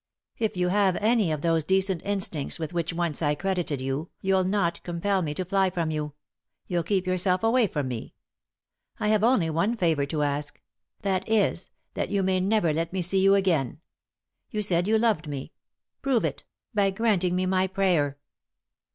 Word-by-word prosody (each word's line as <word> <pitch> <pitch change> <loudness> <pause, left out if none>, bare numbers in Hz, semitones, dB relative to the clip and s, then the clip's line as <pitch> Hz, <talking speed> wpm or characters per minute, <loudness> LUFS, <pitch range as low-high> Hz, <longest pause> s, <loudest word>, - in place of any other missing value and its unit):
If 215 -4 -1
you 180 0 +1
have 195 -1 +3
any 215 -4 +2
of 150 -2 -3
those 165 -1 +2
decent 190 +1 +1
instincts 190 -8 -2
with 160 0 -5
which 170 -1 -1
once 170 -2 -2
I 150 -1 +2
credited 175 -5 -2
you, 135 +5 -3
you'll 190 -1 +2
not 185 -2 0
compel 185 +3 -1
me 150 -3 -3
to 185 - -3
fly 190 +1 +2
from 170 -3 -2
you 150 -1 -3 0.3
— - - -53
you'll 175 -1 0
keep 185 +2 0
yourself 185 +1 +1
away 230 0 +4
from 145 -6 -3
me. 120 -3 -6 0.8
I 210 -1 0
have 215 -1 +3
only 215 -9 +3
one 195 +9 0
favour 160 -7 +1
to 150 0 -1
ask; 145 0 -2 0.4
that 190 0 -1
is, 205 -4 +1 0.2
that - - -2
you 200 -1 0
may 185 0 +2
never 190 -4 +2
let 165 +2 -2
me 185 -1 -1
see 190 +3 +2
you 195 +1 +5
again. 165 -9 +1 0.7
You 210 -1 -1
said 180 -2 +2
you 220 +1 +3
loved 215 -8 +1
me; 140 -2 -6 0.5
prove 265 -4 +1
it - - -4 0.2
— - - -58
by 200 -2 +3
granting 195 -3 +1
me 185 0 +1
my 185 0 +2
prayer." 180 -7 +1
185 Hz, 190 wpm, -26 LUFS, 160-200 Hz, 0.8 s, you